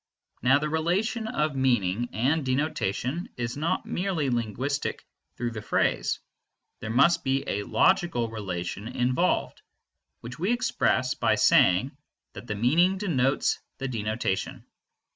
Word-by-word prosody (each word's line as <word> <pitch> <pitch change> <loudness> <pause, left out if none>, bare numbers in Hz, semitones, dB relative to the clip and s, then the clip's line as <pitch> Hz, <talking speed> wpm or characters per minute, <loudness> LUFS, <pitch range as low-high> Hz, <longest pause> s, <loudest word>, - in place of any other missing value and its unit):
Now 130 +3 +5
the 150 +1 -2
relation 185 +9 0
of 150 -7 -1
meaning 120 -4 +1
and 140 +7 +1
denotation 130 - -1
is 120 0 -3
not 155 +4 -1
merely 175 -7 -1
linguistic 120 +5 -2 0.3
through 120 0 -2
the 110 -2 -6
phrase: - - 0 0.6
there 110 - -6
must 160 +9 +4
be 135 +1 0
a 100 - -2
logical 170 - +2
relation 100 -2 -5
involved, 125 +8 0 0.6
which 120 +4 -9
we 195 +8 +1
express 130 - +1
by - - +1
saying 95 +10 +4 0.4
that 120 - -10
the 105 - -3
meaning 165 - +3
denotes 140 -9 +1 0.2
the 135 - -3
denotation. 110 -4 -3
130 Hz, 125 wpm, -27 LUFS, 115-160 Hz, 0.6 s, Now